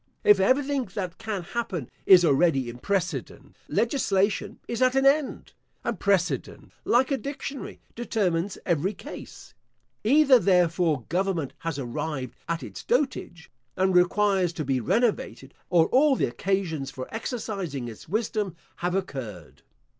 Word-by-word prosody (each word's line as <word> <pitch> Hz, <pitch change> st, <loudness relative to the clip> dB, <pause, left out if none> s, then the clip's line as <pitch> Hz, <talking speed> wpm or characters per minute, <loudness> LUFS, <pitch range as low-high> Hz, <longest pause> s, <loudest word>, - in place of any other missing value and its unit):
If 205 Hz, -2 st, +6 dB
everything 265 Hz, +5 st, +2 dB
that 185 Hz, -3 st, -4 dB
can 205 Hz, -5 st, -4 dB
happen 185 Hz, -, -4 dB, 0.2 s
is 180 Hz, -2 st, +8 dB
already 135 Hz, -4 st, +3 dB
in 120 Hz, -, -12 dB
precedent, 190 Hz, +3 st, -3 dB
legislation 210 Hz, -4 st, 0 dB
is 235 Hz, +1 st, -3 dB
at 255 Hz, 0 st, +4 dB
an 270 Hz, 0 st, +3 dB
end, 280 Hz, +1 st, +1 dB, 0.3 s
and 225 Hz, -, -2 dB
precedent, 200 Hz, -2 st, 0 dB
like 250 Hz, +4 st, +3 dB
a 275 Hz, -, +1 dB
dictionary, 280 Hz, -1 st, -6 dB
determines 200 Hz, -6 st, -1 dB
every 175 Hz, +4 st, 0 dB
case. 295 Hz, -, -10 dB, 0.5 s
Either, 270 Hz, +2 st, +6 dB
therefore, 175 Hz, -, +2 dB
government 175 Hz, -5 st, -1 dB
has 165 Hz, -3 st, -3 dB
arrived 135 Hz, 0 st, -4 dB, 0.2 s
at 165 Hz, 0 st, -2 dB
its -, -, -8 dB
dotage, 245 Hz, -, -1 dB, 0.3 s
and 190 Hz, 0 st, +2 dB
requires 185 Hz, 0 st, +3 dB
to 155 Hz, -3 st, -4 dB
be 135 Hz, -1 st, +1 dB
renovated, 135 Hz, -, -1 dB, 0.2 s
or 170 Hz, -3 st, +5 dB
all 275 Hz, +2 st, +4 dB
the -, -, +1 dB
occasions 175 Hz, -8 st, -2 dB
for 130 Hz, -1 st, -7 dB
exercising 200 Hz, -, -4 dB
its 115 Hz, +5 st, -10 dB
wisdom 210 Hz, -2 st, -1 dB, 0.2 s
have 175 Hz, +1 st, -1 dB
occurred. 105 Hz, -, -5 dB
190 Hz, 135 wpm, -26 LUFS, 160-230 Hz, 0.5 s, is